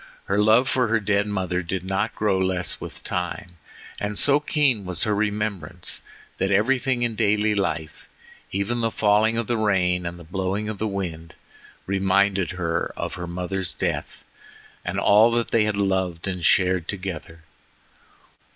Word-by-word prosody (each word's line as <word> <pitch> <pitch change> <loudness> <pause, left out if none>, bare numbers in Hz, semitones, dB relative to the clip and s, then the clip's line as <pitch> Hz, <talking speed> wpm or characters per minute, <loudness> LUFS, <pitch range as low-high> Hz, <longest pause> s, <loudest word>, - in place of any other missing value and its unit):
Her 100 +1 0
love 110 +5 +5
for 125 -2 +2
her 115 0 +2
dead 100 0 +1
mother 95 -3 -1
did 90 +1 -4
not 95 +4 -1
grow 100 -3 +1
less 95 -1 0
with - - -9
time, 90 0 -4 0.4
and 105 0 -3
so 145 0 +5
keen 145 -7 +1
was 90 -2 -1
her 105 - +1
remembrance, 105 -4 -2 0.4
that 95 - +1
everything 120 +5 +2
in 120 -1 0
daily 105 -1 +2
life, 80 -6 -3 0.4
even 100 +5 -1
the 115 - +1
falling 110 +1 +2
of 115 - 0
the 120 +1 -1
rain 90 -4 +1
and 85 0 -6
the 85 - -11
blowing 95 +4 -2
of 105 -2 -5
the 110 - 0
wind, 85 -5 -5 0.5
reminded 95 -1 +2
her 85 -2 -2
of - - -3
her 90 -1 -5
mother's 90 +2 -1
death - - -3 0.6
and - - -3
of - - 0
all 105 +3 +6
that 120 0 0
they 110 -2 +3
had 105 -1 -1
loved 95 -3 -1
and 90 -2 -3
shared 90 -2 +3
together. 85 -4 -5
100 Hz, 165 wpm, -24 LUFS, 90-110 Hz, 0.6 s, all